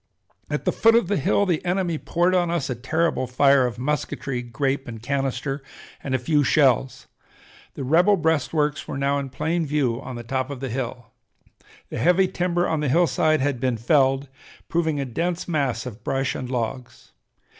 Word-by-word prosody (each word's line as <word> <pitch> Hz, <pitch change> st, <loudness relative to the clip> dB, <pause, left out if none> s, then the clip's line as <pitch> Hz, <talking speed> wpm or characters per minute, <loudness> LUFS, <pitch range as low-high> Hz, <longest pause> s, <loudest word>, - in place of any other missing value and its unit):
At -, -, -3 dB
the -, -, +3 dB
foot 225 Hz, 0 st, +4 dB
of 230 Hz, -6 st, +2 dB
the 205 Hz, -, +1 dB
hill 205 Hz, +7 st, +2 dB
the 175 Hz, -5 st, 0 dB
enemy 175 Hz, -3 st, -1 dB
poured 175 Hz, +2 st, +1 dB
on 175 Hz, -2 st, +2 dB
us 170 Hz, -6 st, -1 dB
a -, -, +1 dB
terrible 145 Hz, +2 st, 0 dB
fire 135 Hz, +1 st, +4 dB
of 115 Hz, -, -6 dB
musketry, 135 Hz, -1 st, -2 dB
grape 135 Hz, +4 st, -2 dB
and 115 Hz, -2 st, -7 dB
canister, 135 Hz, +2 st, -2 dB, 0.4 s
and 135 Hz, -2 st, -1 dB
a -, -, +3 dB
few 145 Hz, +4 st, +1 dB
shells. 135 Hz, -3 st, +2 dB, 0.7 s
The -, -, -5 dB
rebel 175 Hz, +9 st, +4 dB
breastworks 155 Hz, -2 st, 0 dB
were -, -, -4 dB
now 140 Hz, +1 st, +1 dB
in 135 Hz, -1 st, -5 dB
plain 160 Hz, +6 st, -1 dB
view 135 Hz, -5 st, 0 dB
on 130 Hz, -2 st, -7 dB
the 120 Hz, -, -6 dB
top 130 Hz, +2 st, -2 dB
of 140 Hz, -3 st, -6 dB
the 135 Hz, 0 st, -4 dB
hill. 125 Hz, -1 st, -5 dB, 0.8 s
The -, -, -5 dB
heavy 180 Hz, +2 st, +4 dB
timber 175 Hz, -1 st, 0 dB
on 160 Hz, -, 0 dB
the 150 Hz, -2 st, 0 dB
hillside 160 Hz, -1 st, +2 dB
had 135 Hz, -2 st, 0 dB
been 125 Hz, -2 st, 0 dB
felled, 135 Hz, +3 st, +2 dB, 0.4 s
proving 160 Hz, -3 st, 0 dB
a 140 Hz, -, -1 dB
dense 170 Hz, +7 st, -2 dB
mass 135 Hz, -8 st, -1 dB
of 120 Hz, -3 st, -8 dB
brush 135 Hz, 0 st, -1 dB
and 125 Hz, -, -5 dB
logs. 125 Hz, 0 st, -5 dB
140 Hz, 185 wpm, -23 LUFS, 130-165 Hz, 0.8 s, foot